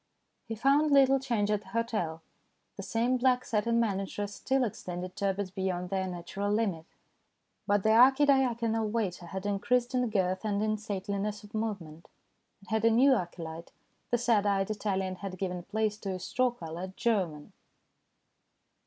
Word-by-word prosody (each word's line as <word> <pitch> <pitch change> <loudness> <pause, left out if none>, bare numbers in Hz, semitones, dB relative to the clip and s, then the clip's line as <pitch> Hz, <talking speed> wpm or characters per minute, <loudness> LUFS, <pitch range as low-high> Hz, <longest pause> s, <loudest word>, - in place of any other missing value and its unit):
He 225 - -4
found 275 +6 +3
little 270 -1 +5
change 230 -6 0
at 210 -1 +1
the 200 - -19
hotel. 190 -7 -2 0.5
The - - -6
same 230 +6 0
black 255 0 +2
satin 230 +2 +1
manageress 205 -1 -2
still 265 +4 0
extended 180 -4 -5
turbots 200 -2 -2
beyond 185 -1 -2
their 190 -1 0
natural 185 +3 -4
limit; 195 -7 -1 0.8
but 205 -1 +2
the 220 - +3
archidiaconal 240 -3 +4
waiter 195 -6 -2
had 190 +3 -6
increased 240 +5 0
in 250 -2 +1
girth 185 -2 0
and 210 -1 0
in 215 0 0
stateliness 205 0 -3
of 205 - -14
movement, 195 -8 -4 0.5
and 200 - -15
had 220 0 +1
a 230 - +6
new 255 +5 +5
acolyte 170 -5 -5 0.4
the 240 - +2
sad 225 -3 +2
eyed 195 0 +1
Italian 195 -3 -2
had 190 -1 -6
given 180 -1 -3
place 215 +2 -2
to 195 -3 -4
a - - -6
straw 255 +7 +1
coloured 180 -3 -7
German. 195 -11 -1
205 Hz, 155 wpm, -30 LUFS, 190-230 Hz, 0.8 s, a